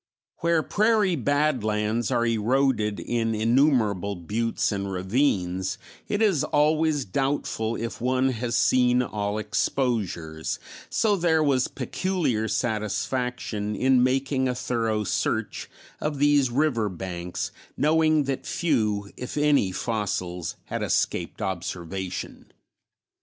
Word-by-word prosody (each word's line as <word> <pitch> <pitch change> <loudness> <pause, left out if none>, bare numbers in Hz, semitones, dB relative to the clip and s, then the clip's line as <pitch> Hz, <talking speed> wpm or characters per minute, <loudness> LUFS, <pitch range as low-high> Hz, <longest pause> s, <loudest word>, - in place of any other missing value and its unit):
Where 170 -1 +2
prairie 210 -2 +2
badlands 120 -6 0
are 120 - +1
eroded 115 -1 +1
in 115 -2 -1
innumerable 110 - +2
buttes 110 +8 -1
and 100 -1 -3
ravines 95 -2 0 0.3
it 205 +2 +1
is 190 -10 +3
always 150 -1 +2
doubtful 115 -1 -1
if 110 -3 -5
one 130 +1 +2
has 120 -1 -2
seen 125 0 +4
all 105 -3 -2
exposures, 100 - -1 0.3
so 215 -2 +2
there 165 -4 +2
was 135 -3 +2
peculiar 160 - -1
satisfaction 110 -1 -2
in 130 +3 +3
making 130 +1 +1
a 125 - -1
thorough 115 -3 -1
search - - -2 0.3
of 150 -1 -2
these 145 -2 +4
river 120 -5 +1
banks 90 -1 -5 0.3
knowing 155 0 +3
that 135 -1 -3
few 105 - 0
if 125 +3 -6
any 145 -10 +3
fossils 90 -5 -2
had - - -4
escaped 90 +5 -1
observation. 95 0 -5
120 Hz, 110 wpm, -25 LUFS, 105-145 Hz, 0.3 s, seen